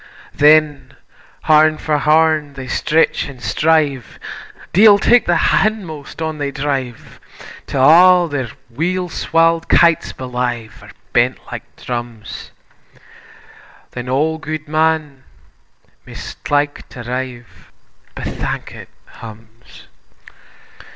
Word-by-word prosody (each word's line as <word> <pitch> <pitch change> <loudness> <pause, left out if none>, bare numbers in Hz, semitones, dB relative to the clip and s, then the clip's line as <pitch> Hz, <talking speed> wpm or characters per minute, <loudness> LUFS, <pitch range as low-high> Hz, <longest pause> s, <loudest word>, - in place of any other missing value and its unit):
Then 150 -3 +3 0.5
horn 155 0 +4
for 150 -1 -1
horn 155 0 +2
they 135 -1 -8
stretch 155 +3 0
an' 135 - -11
strive, 140 +3 0 0.6
Deil 205 +2 +7
tak 240 +3 +3
the 175 - +3 0.2
hindmost, 175 -8 -2
on 160 -1 -4
they 145 -1 -2
drive, 135 -4 -4 0.5
'Till 130 - 0
a' 175 +4 +6
their 140 -6 -4 0.2
weel 180 +7 -2
swall'd 165 0 +1
kytes 170 -1 +3
belyve 125 -4 -5
Are - - -14 0.2
bent - - +2
like - - -9
drums; 120 -3 -7 1.4
Then 125 0 -7
auld 155 +4 0
Guidman, 155 -2 -1 0.9
maist - - -9
like 145 0 -1
to 120 - -9
rive, 125 -1 -7 0.4
Bethankit - - -6 0.3
hums. 115 +1 -14
150 Hz, 100 wpm, -17 LUFS, 130-160 Hz, 1.4 s, Deil